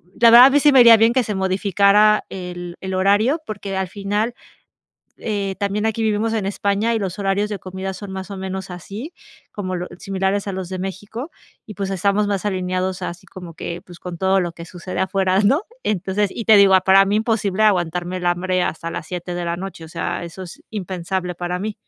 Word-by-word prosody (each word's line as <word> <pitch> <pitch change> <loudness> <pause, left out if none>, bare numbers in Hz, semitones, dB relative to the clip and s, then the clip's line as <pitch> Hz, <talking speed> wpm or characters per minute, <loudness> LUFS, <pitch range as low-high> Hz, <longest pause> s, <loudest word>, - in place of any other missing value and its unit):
ya 235 -1 +6
va, 240 +2 +10
a 270 - +7
mí 290 - +4
sí 295 0 +5
me 270 - +6
haría 235 -1 +9
bien 225 +2 +4
que 255 0 +2
se 210 - -3
modificara 200 +2 +3
el 175 -2 -7
el 190 0 -4
horario, 205 - +2
porque 200 -2 -5
al 190 - -1
final, 205 +4 -2 0.8
eh 200 -3 -2
también 205 +2 -1
aquí, 225 0 -1
vivimos 220 +1 0
en 215 - -1
España 200 +3 0
y - - +1
los 190 -1 -4
horarios 200 +1 0
de 205 - -3
comida 190 +1 -6
son 200 +1 -8
más 190 +1 -6
o 200 - -5
menos 190 0 -5
así 200 - -8 0.4
como 185 -3 -4
lo 180 - -4
similares 195 +1 -1
a 195 - -2
los 185 -1 -5
de 185 0 -5
México 205 - -6 0.4
y, 215 - -8
pues, 195 0 -3
estamos 200 +2 +1
más 200 -1 -2
alineados 185 -1 -2
así 175 0 -6
como 180 -3 -10
que, 170 +2 -6
pues 175 -1 -14
con 175 -2 -7
todo 190 +1 +2
lo 175 -1 -2
que 170 0 -10
sucede 180 +1 -6
afuera, 190 0 +1
¿no? 270 - +3 0.2
Entonces, 200 0 0
y 230 - -4
te 220 - +7
digo, 200 -1 +6
para 195 +1 +7
mí 205 +2 +1
imposible 215 -2 0
aguantarme 180 -2 +1
el 175 - -4
hambre 180 +1 +1
hasta 165 0 -3
las 160 - -6
7 180 0 -5
de 175 - -3
la 170 - -1
noche, 180 -2 -7
o - - -11
sea, - - -3
eso 170 +3 -9
es 175 - -12
impensable 185 -2 -3
para 175 +1 -3
mí. 215 +2 -4
195 Hz, 215 wpm, -20 LUFS, 185-210 Hz, 0.8 s, va